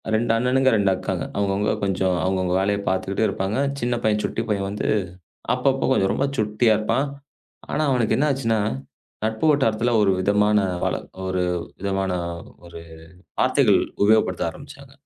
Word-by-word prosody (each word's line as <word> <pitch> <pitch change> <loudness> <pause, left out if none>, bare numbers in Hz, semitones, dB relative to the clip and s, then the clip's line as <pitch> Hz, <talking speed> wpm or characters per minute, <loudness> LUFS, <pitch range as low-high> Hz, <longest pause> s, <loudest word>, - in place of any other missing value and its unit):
2 115 +1 +1
அண்ணனுங்க, 130 +2 +2
2 100 -2 +2
அக்காங்க. - - -3
அவங்க 100 -1 +1
அவங்க 105 +2 0
கொஞ்சம் 95 -1 +1
அவங்க 95 0 0
அவங்க 90 0 0
வேலைய 100 +1 0
பாத்துக்கிட்டு 95 +3 0
இருப்பாங்க. 95 +2 -2 0.2
சின்னப் 120 -1 -1
பையன் 105 -1 +1
சுட்டிப் 115 0 -3
பையன் 100 -2 0
வந்து 105 - -3 0.7
அப்பப்போ - - +1
கொஞ்சம் 95 0 +2
ரொம்ப 135 - 0
சுட்டியா 110 +1 +2
இருப்பான். 135 +6 0 0.6
ஆனா 155 - 0
அவனுக்கு 120 -4 +1
என்ன 150 - +2
ஆச்சுன்னா, 115 -5 0 0.7
நட்பு 110 +6 0
வட்டாரத்துல 120 -5 +1
ஒரு 100 - +3
விதமான 105 +2 +2 0.7
ஒரு 95 -1 -1 0.4
விதமான 95 -1 -1 0.6
ஒரு 85 -1 -10 0.6
வார்த்தைகள் - - +4 0.2
உபயோகப்படுத்த 110 +1 +2
ஆரம்பிச்சாங்க. 140 -1 -13
105 Hz, 145 wpm, -23 LUFS, 95-120 Hz, 0.7 s, வார்த்தைகள்